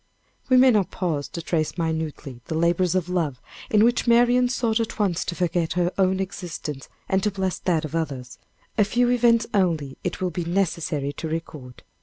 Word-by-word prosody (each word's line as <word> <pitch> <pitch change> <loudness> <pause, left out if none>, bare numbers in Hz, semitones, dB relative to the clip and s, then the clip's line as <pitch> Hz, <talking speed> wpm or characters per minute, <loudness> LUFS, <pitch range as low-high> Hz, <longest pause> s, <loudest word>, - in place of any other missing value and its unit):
We 255 - +6
may 255 0 +7
not 210 -5 +2
pause 160 -6 -2
to 170 - -7
trace 160 -1 -1
minutely 160 -6 -3
the 160 - -2
labors 170 +2 +2
of 180 -2 0
love 165 -8 -1 0.3
in 215 0 +4
which 240 +1 +2
Marian 245 +1 +4
sought 235 -3 0
at 225 - -3
once 195 -6 +1
to 170 - -3
forget 175 -2 0
her 175 +1 +1
own 190 -1 +2
existence 170 -7 -5 0.2
and 190 0 +1
to 210 - +1
bless 190 -2 -2
that 165 -4 0
of 155 - -8
others. 135 -7 -4 0.4
A - - +7
few 240 +4 +2
events 235 -2 +4
only 165 -9 0
it 180 - -3
will 185 -1 -1
be 175 +1 -3
necessary 165 -5 -1
to 160 - -5
record. 150 -6 -6
180 Hz, 190 wpm, -24 LUFS, 160-205 Hz, 0.4 s, may